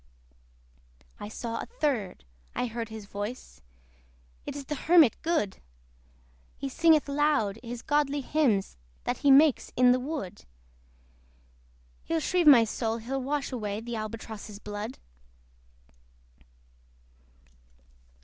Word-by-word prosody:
I 205 - -6
saw 230 +1 -4
a - - -5
third 275 - -2 0.3
I - - 0
heard 230 -1 -5
his 220 -2 -8
voice: 205 +5 -7 0.9
It - - -4
is 285 -1 -6
the 300 - -3
Hermit 315 -2 +5
good! 315 - -1 1.0
He 275 - -4
singeth 320 +1 +4
loud 280 -8 +1
his 240 0 -7
godly 290 -1 +1
hymns 250 - +1 0.3
That - - -2
he 285 - +3
makes 285 +1 +5
in 250 0 +6
the 250 - +3
wood. 260 - -5 1.6
He'll 330 - -1
shrieve 345 +1 +1
my 255 -6 +9
soul, 225 0 -2
he'll 260 +4 -4
wash 280 +2 -2
away 210 -4 -3
The 235 +1 -6
Albatross's 215 -1 -6
blood. 210 +3 -6
250 Hz, 115 wpm, -28 LUFS, 220-290 Hz, 1.6 s, my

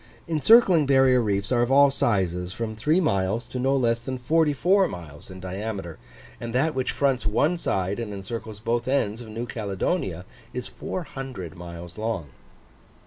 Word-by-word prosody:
Encircling 170 - +5
barrier 130 -2 +5
reefs 100 -3 -1
are 120 -2 +3
of 120 +2 +1
all 140 0 +6
sizes, 90 -8 0
from 110 -1 -4
three 150 +11 +2
miles 105 - 0
to 125 - -6
no 135 +2 +2
less 115 -2 +2
than 130 +2 -5
forty 155 +5 +2
four 185 +7 +3
miles 80 - -10
in 95 0 -9
diameter; 95 -1 -5 0.4
and 115 0 -5
that 155 +5 +2
which 130 -2 -1
fronts 135 -5 0
one 145 +11 +2
side, 95 - -1
and 115 -3 -4
encircles 105 +2 -6
both 120 +2 -1
ends, 120 -5 0
of 120 - -9
New 115 +2 -4
Caledonia, 100 - -2 0.3
is 125 - -3
400 135 - -6
miles 85 +1 -9
long. 110 -9 -2
115 Hz, 165 wpm, -25 LUFS, 95-135 Hz, 0.4 s, all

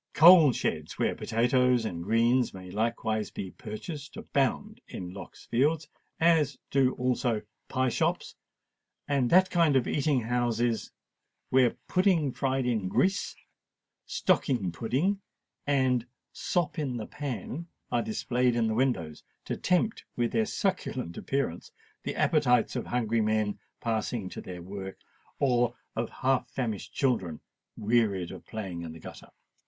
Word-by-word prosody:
Coal 165 -3 +9
sheds, 80 -8 -3
where - - +1
potatoes 125 +1 +2
and 85 -5 -4
greens 115 +3 +2
may 90 -1 -9
likewise 110 0 -1
be 95 -2 -6
purchased, 140 +8 -7
abound 205 - -1
in 90 -1 -7
Lock's 95 -2 -10
Fields; 145 +5 +1 0.3
as 160 -5 +3
do 135 -2 +3
also 125 -3 0 0.2
pie 130 -1 +1
shops - - -1 0.7
and 140 -4 +1
that 185 +1 +5
kind 165 -5 +3
of 130 - +3
eating 145 -3 +1
houses 120 0 0 0.6
where 130 -2 +4
pudding 180 -7 +3
fried 135 0 -1
in 110 -6 0
grease, 190 - +1 0.7
stocking 105 -10 +1
pudding, 140 - 0 0.5
and 130 -4 +2 0.3
sop 175 -2 -1
in 135 -5 -2
the 110 - -4
pan 145 +3 -5 0.2
are - - +2
displayed 125 - 0
in 115 -1 +2
the 110 - 0
windows, 110 - -1 0.2
to - - -2
tempt 185 +5 +1
with 120 -1 0
their 220 -1 +1
succulent 130 - -2
appearance 135 -11 -2 0.3
the - - -4
appetites 125 -2 +3
of - - -3
hungry 115 -2 +1
men 110 -1 0 0.2
passing 110 -3 -2
to - - -7
their 90 -2 -8
work, 95 +1 -7 0.4
or 120 -3 +2 0.2
of - - -1
half 130 -2 0
famished 115 -7 -3
children 95 - 0 0.4
wearied 105 -5 +1
of - - -9
playing 95 -6 -5
in 80 -2 -6
the 80 - -11
gutter. - - -11
125 Hz, 135 wpm, -29 LUFS, 110-140 Hz, 0.7 s, Coal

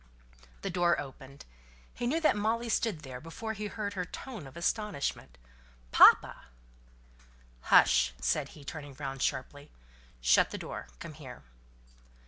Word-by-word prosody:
The 195 - -2
door 175 -1 +2
opened. 135 -1 -10 0.5
He 240 - -3
knew 310 +6 +1
that 310 - +4
Molly 225 +3 -1
stood 210 -7 0
there 130 -3 -8
before 220 +8 -5
he 210 0 -4
heard 205 -1 -4
her 185 -2 -2
tone 210 - -8
of 135 - -13
astonishment. 170 - -2 0.5
"Papa!" - - +6 1.2
"Hush!" 60 0 +6
said - - 0
he, 145 - -12
turning 145 -1 -8
round 135 -2 -5
sharply. 145 +3 -3 0.5
"Shut - - +4
the - - -5
door. - - -7
Come - - -9
here." 70 - -11
165 Hz, 135 wpm, -30 LUFS, 135-210 Hz, 1.2 s, Papa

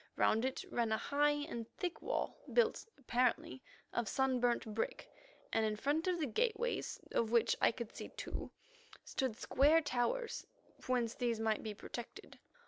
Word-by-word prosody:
Round 220 +2 +3
it 260 - -2
ran 235 -2 +1
a 220 - +3
high 290 +4 +2 0.2
and 230 -4 -5
thick 360 -3 -3
wall, - - -2
built, 475 -1 +2
apparently, 245 - +1 0.3
of 235 -4 0
sun 265 -1 +2
burnt 240 -1 +2
brick, 225 - -2 0.5
and 225 - +3
in 215 -1 +1
front 290 - 0
of 360 -1 +1
the 310 - +1
gateways, 470 - 0
of 230 - +1
which 235 0 +4
I - - +6
could 235 -1 -7
see - - -6
two, - - -5 0.6
stood 260 -5 -1
square 290 +5 +5
towers 315 - -1 0.4
whence 245 -3 +1
these 235 -3 0
might 220 -1 +1
be 215 -2 -5
protected. 240 - -8
245 Hz, 160 wpm, -36 LUFS, 225-295 Hz, 0.6 s, I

